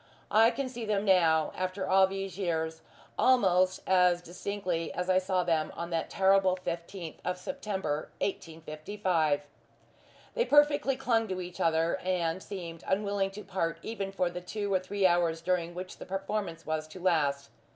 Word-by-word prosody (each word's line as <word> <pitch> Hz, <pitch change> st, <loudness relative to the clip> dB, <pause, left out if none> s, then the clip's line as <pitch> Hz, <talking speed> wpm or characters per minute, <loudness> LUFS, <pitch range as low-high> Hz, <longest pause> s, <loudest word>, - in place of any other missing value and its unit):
I 225 Hz, +2 st, +6 dB
can 275 Hz, +2 st, -3 dB
see 245 Hz, -2 st, -6 dB
them 210 Hz, -1 st, 0 dB
now, 165 Hz, -5 st, +4 dB
after 185 Hz, +1 st, -3 dB
all 190 Hz, 0 st, +5 dB
these 195 Hz, -2 st, -5 dB
years, 160 Hz, -4 st, -2 dB, 0.4 s
almost 185 Hz, -7 st, +4 dB
as 180 Hz, -2 st, +4 dB
distinctly 180 Hz, -1 st, -3 dB
as 180 Hz, +1 st, 0 dB
I 185 Hz, -, +5 dB
saw 185 Hz, -1 st, 0 dB
them 160 Hz, -3 st, 0 dB
on 170 Hz, +1 st, -5 dB
that 165 Hz, -1 st, -1 dB
terrible 190 Hz, -1 st, +4 dB
fifteenth 170 Hz, -1 st, -6 dB
of 180 Hz, 0 st, -2 dB
September, 190 Hz, -, -3 dB
1855. 160 Hz, -2 st, -1 dB, 0.9 s
They 480 Hz, -1 st, +1 dB
perfectly 290 Hz, -2 st, +4 dB
clung 230 Hz, -4 st, +1 dB
to 185 Hz, -2 st, -3 dB
each 180 Hz, -1 st, -7 dB
other, 165 Hz, 0 st, +2 dB
and 180 Hz, -1 st, -1 dB
seemed 170 Hz, -5 st, -7 dB
unwilling 200 Hz, 0 st, 0 dB
to 205 Hz, +2 st, -9 dB
part 180 Hz, -4 st, -2 dB
even 200 Hz, -3 st, -4 dB
for 180 Hz, -2 st, 0 dB
the 180 Hz, 0 st, -6 dB
two 205 Hz, +2 st, -3 dB
or 190 Hz, -, +4 dB
three 195 Hz, +1 st, -1 dB
hours 175 Hz, -2 st, +3 dB
during 175 Hz, 0 st, -1 dB
which 185 Hz, +1 st, -7 dB
the -, -, -9 dB
performance 195 Hz, -3 st, -3 dB
was 155 Hz, 0 st, -2 dB
to 155 Hz, +4 st, -11 dB
last. 145 Hz, -6 st, +1 dB
185 Hz, 160 wpm, -30 LUFS, 165-195 Hz, 0.9 s, I